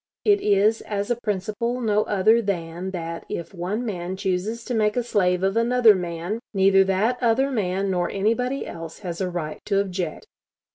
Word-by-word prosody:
It 410 -1 +4
is 210 +2 +3
as 205 +2 -3
a - - +3
principle 215 +4 -2
no 210 -3 +2
other 215 +3 +3
than 175 -3 -3
that, 165 -2 -5
if 170 - -5
one 195 +7 -3
man 185 -3 -4
chooses 200 +4 -2
to 250 - -3
make 215 0 +1
a 245 - +1
slave 185 -5 +1
of 195 +2 +1
another 230 -1 +5
man, 175 +3 -3 0.2
neither 195 0 +5
that 210 +6 +1
other 250 +4 +2
man 195 -4 -1
nor 180 -1 0
anybody 240 +7 0
else 165 -1 -8
has 175 +1 -4
a 185 - 0
right 165 -3 -4
to 200 -1 +1
object.... 185 -4 -3
200 Hz, 180 wpm, -24 LUFS, 180-225 Hz, 0.2 s, another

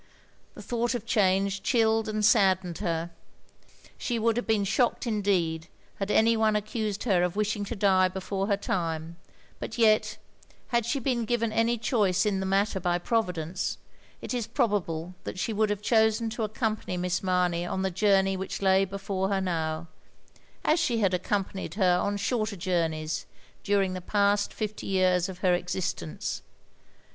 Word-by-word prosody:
The - - -10
thought 240 +1 -1
of 245 - -4
change 195 -2 +2
chilled 225 -2 +2
and 215 -1 0
saddened 190 -5 +3
her. 170 -3 -2 0.9
She 240 - -1
would 225 0 +2
have 240 - -2
been 220 -2 +2
shocked 235 +6 +1
indeed 185 -7 0 0.3
had 195 0 -3
any 225 +2 +4
one 220 -1 +2
accused 210 -1 -2
her 195 -7 +2
of 180 +1 0
wishing 210 0 0
to 235 - -5
die 190 -2 +4
before 190 +1 -3
her 200 -2 +2
time; 165 -3 -3 0.4
but 220 - -6
yet, 215 -2 +3 0.5
had 235 -2 +1
she 275 - 0
been 245 -3 -1
given 230 -1 0
any 230 +2 +2
choice 215 -5 +1
in 200 -2 +1
the 190 - -2
matter 195 +1 +1
by 175 -1 +1
Providence, 180 -4 -1 0.5
it - - -4
is 240 -3 -2
probable 185 - -1
that - - -6
she 220 +4 -1
would 215 0 +1
have 205 0 -2
chosen 220 0 +2
to 235 - -4
accompany 215 -3 -2
Miss 180 0 -1
Mamey 180 -2 +1
on 190 +2 -2
the 190 - 0
joiUTiey 195 0 +2
which 190 0 -4
lay 190 0 +4
before 195 0 -3
her 195 -1 +1
now, 165 -3 -2 0.4
— - - -30
as 310 +3 +3
she 255 -8 +1
had 195 -4 +2
accompanied 190 +1 -2
her 180 -3 +3
on 205 +2 -1
shorter 215 0 -1
jotimeys, 165 -3 -1 0.4
dtuing 200 -2 +1
the 185 - -5
past 200 +2 +1
fifty 215 -1 -5
years 185 -1 +2
of 185 - -7
her 180 - +5
existence. 175 - -3
200 Hz, 170 wpm, -27 LUFS, 180-220 Hz, 0.9 s, her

